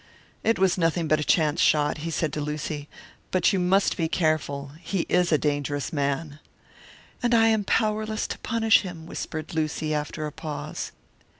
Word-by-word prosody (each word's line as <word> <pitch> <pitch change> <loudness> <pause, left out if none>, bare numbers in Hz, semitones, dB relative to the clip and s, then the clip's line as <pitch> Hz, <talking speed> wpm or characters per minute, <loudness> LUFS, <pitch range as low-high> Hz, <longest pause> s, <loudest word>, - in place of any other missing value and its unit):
"It 225 - +2
was 190 -1 +2
nothing 165 0 +1
but 155 0 +3
a - - 0
chance 155 0 +2
shot," 150 0 +3
he 165 +2 -4
said 160 -2 -1
to 150 - -2
Lucy, 150 0 -4 0.4
"but 185 +3 +3
you 190 - +2
must 190 +3 +2
be 165 -3 +1
careful. 150 -4 0
He 190 0 -1
is 180 -1 +3
a 155 - +5
dangerous 145 +1 -1
man." 145 +1 -1 0.8
"And 240 -1 +3
I 225 0 +5
am 220 -2 +2
powerless 215 +1 0
to - - -5
punish 225 -1 +3
him!" 175 -4 -8
whispered 155 -1 -5
Lucy, 155 -1 -1
after 150 +1 -3
a 150 - -4
pause. 150 -1 -5
160 Hz, 175 wpm, -26 LUFS, 150-185 Hz, 0.8 s, a